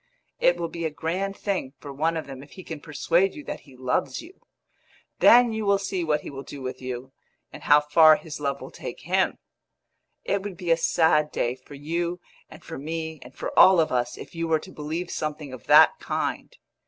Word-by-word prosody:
it 175 Hz, -, +4 dB
will 170 Hz, -1 st, -2 dB
be 170 Hz, 0 st, -6 dB
a 160 Hz, -, 0 dB
grand 180 Hz, +6 st, -3 dB
thing 185 Hz, -10 st, -3 dB
for 140 Hz, -2 st, -9 dB
one 160 Hz, +4 st, 0 dB
of 160 Hz, -, -4 dB
them 135 Hz, -1 st, -9 dB
if 145 Hz, -, -15 dB
he 185 Hz, -, -10 dB
can 160 Hz, -3 st, -7 dB
persuade 170 Hz, +6 st, +1 dB
you 300 Hz, -, -8 dB
that -, -, -6 dB
he 135 Hz, -3 st, -18 dB
loves 130 Hz, +1 st, -1 dB
you. 350 Hz, +4 st, -13 dB, 0.8 s
Then 240 Hz, -1 st, +7 dB
you 220 Hz, 0 st, -2 dB
will 200 Hz, -1 st, +3 dB
see 195 Hz, -2 st, -3 dB
what 150 Hz, -2 st, +1 dB
he -, -, -8 dB
will 135 Hz, -1 st, -7 dB
do 140 Hz, 0 st, -9 dB
with 130 Hz, 0 st, -6 dB
you, 130 Hz, 0 st, -6 dB, 0.4 s
and -, -, -10 dB
how 150 Hz, 0 st, +5 dB
far 155 Hz, +1 st, +6 dB
his 155 Hz, -2 st, -8 dB
love 140 Hz, -1 st, -2 dB
will -, -, -9 dB
take -, -, -8 dB
him! -, -, +1 dB, 0.9 s
It 200 Hz, -, 0 dB
would 195 Hz, -3 st, -7 dB
be 175 Hz, -2 st, -2 dB
a -, -, +7 dB
sad 160 Hz, -2 st, +2 dB
day 120 Hz, -, -1 dB
for 130 Hz, +2 st, -14 dB
you 170 Hz, +5 st, -3 dB, 0.3 s
and -, -, -14 dB
for 165 Hz, -, -7 dB
me 160 Hz, +1 st, -5 dB
and 125 Hz, +1 st, -13 dB
for -, -, -4 dB
all 185 Hz, -2 st, +8 dB
of 160 Hz, -, +2 dB
us 120 Hz, -1 st, -1 dB
if -, -, -10 dB
you 165 Hz, 0 st, -3 dB
were 160 Hz, -1 st, +3 dB
to 185 Hz, +4 st, -11 dB
believe 160 Hz, +3 st, -5 dB
something 150 Hz, -3 st, -4 dB
of 125 Hz, -, -11 dB
that -, -, +7 dB
kind. -, -, -3 dB
160 Hz, 220 wpm, -25 LUFS, 140-175 Hz, 0.9 s, all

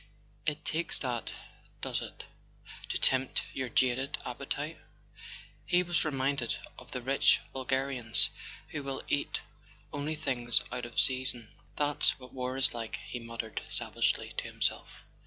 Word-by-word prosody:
It 155 Hz, +1 st, -1 dB
takes 165 Hz, +1 st, +2 dB
that, 120 Hz, -3 st, -1 dB, 0.5 s
does -, -, 0 dB
it, -, -, -7 dB, 0.6 s
to -, -, +1 dB
tempt 130 Hz, 0 st, +4 dB
your 130 Hz, -2 st, -2 dB
jaded 130 Hz, +3 st, +2 dB
appetite?" -, -, -3 dB, 0.9 s
He 180 Hz, 0 st, +5 dB
was 175 Hz, -1 st, +2 dB
reminded 135 Hz, -4 st, +1 dB, 0.2 s
of -, -, -13 dB
the 125 Hz, -, -4 dB
rich 135 Hz, +2 st, +5 dB
vulgarians 130 Hz, -3 st, +2 dB, 0.4 s
who 145 Hz, -, -3 dB
will 135 Hz, -1 st, -3 dB
eat 145 Hz, -, 0 dB, 0.5 s
only 145 Hz, +2 st, -1 dB
things 125 Hz, -6 st, +1 dB
out 125 Hz, -1 st, -3 dB
of 120 Hz, -, -1 dB
season. 130 Hz, -4 st, +2 dB, 0.3 s
"That's 145 Hz, 0 st, +3 dB
what 125 Hz, -1 st, -12 dB
war 130 Hz, 0 st, -2 dB
is 135 Hz, 0 st, +4 dB
like," 115 Hz, -2 st, -3 dB
he 120 Hz, -, -2 dB
muttered 115 Hz, -1 st, -4 dB
sav¬ -, -, 0 dB
agely -, -, +1 dB
to -, -, +1 dB
himself. -, -, -2 dB
130 Hz, 140 wpm, -32 LUFS, 120-140 Hz, 0.9 s, He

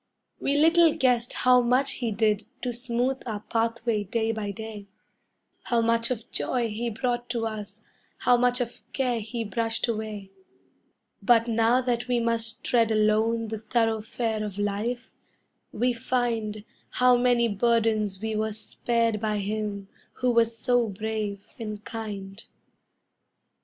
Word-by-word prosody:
We 280 Hz, +1 st, +1 dB
little 325 Hz, +1 st, +5 dB
guessed 245 Hz, -2 st, +2 dB
how 250 Hz, 0 st, +4 dB
much 250 Hz, +3 st, +2 dB
he 240 Hz, -3 st, -2 dB
did 215 Hz, 0 st, +1 dB, 0.2 s
to 250 Hz, -1 st, -1 dB
smooth 245 Hz, +2 st, -1 dB
our 210 Hz, -3 st, -3 dB
pathway 230 Hz, -1 st, -1 dB
day 225 Hz, +2 st, 0 dB
by 215 Hz, -2 st, -3 dB
day, 210 Hz, 0 st, -7 dB, 0.8 s
How 235 Hz, -, +2 dB
much 230 Hz, 0 st, +2 dB
of 240 Hz, -2 st, -4 dB
joy 240 Hz, -3 st, -1 dB
he 230 Hz, +3 st, -2 dB
brought 240 Hz, +2 st, -2 dB
to 235 Hz, -2 st, -1 dB
us, 215 Hz, -1 st, -6 dB, 0.3 s
how 245 Hz, -, +4 dB
much 245 Hz, +1 st, +2 dB
of 235 Hz, -2 st, -5 dB
care 250 Hz, -3 st, 0 dB
he 225 Hz, +2 st, -4 dB
brushed 225 Hz, +3 st, -1 dB
away; 215 Hz, -3 st, -4 dB, 0.9 s
But 235 Hz, -1 st, +4 dB
now 230 Hz, +2 st, +3 dB
that 245 Hz, -1 st, -1 dB
we 245 Hz, -1 st, +2 dB
must 230 Hz, -1 st, -1 dB
tread 230 Hz, -2 st, +3 dB
alone 220 Hz, +1 st, +2 dB
the 220 Hz, -1 st, -4 dB
thoroughfare 225 Hz, 0 st, -1 dB
of 205 Hz, -2 st, -5 dB
life, 205 Hz, +4 st, -2 dB, 0.6 s
we 245 Hz, +3 st, +1 dB
find 230 Hz, -4 st, -1 dB, 0.3 s
How 250 Hz, 0 st, +4 dB
many 245 Hz, -1 st, +3 dB
burdens 215 Hz, -2 st, +1 dB
we 220 Hz, +1 st, -3 dB
were 215 Hz, 0 st, -1 dB
spared 230 Hz, +1 st, -1 dB
by 215 Hz, -1 st, 0 dB
him 205 Hz, -1 st, -3 dB, 0.3 s
who 250 Hz, -1 st, +1 dB
was 230 Hz, -1 st, +2 dB
so 245 Hz, 0 st, +2 dB
brave 205 Hz, 0 st, -4 dB
and 215 Hz, -2 st, -6 dB
kind. 205 Hz, -3 st, -6 dB
230 Hz, 140 wpm, -26 LUFS, 215-240 Hz, 0.9 s, little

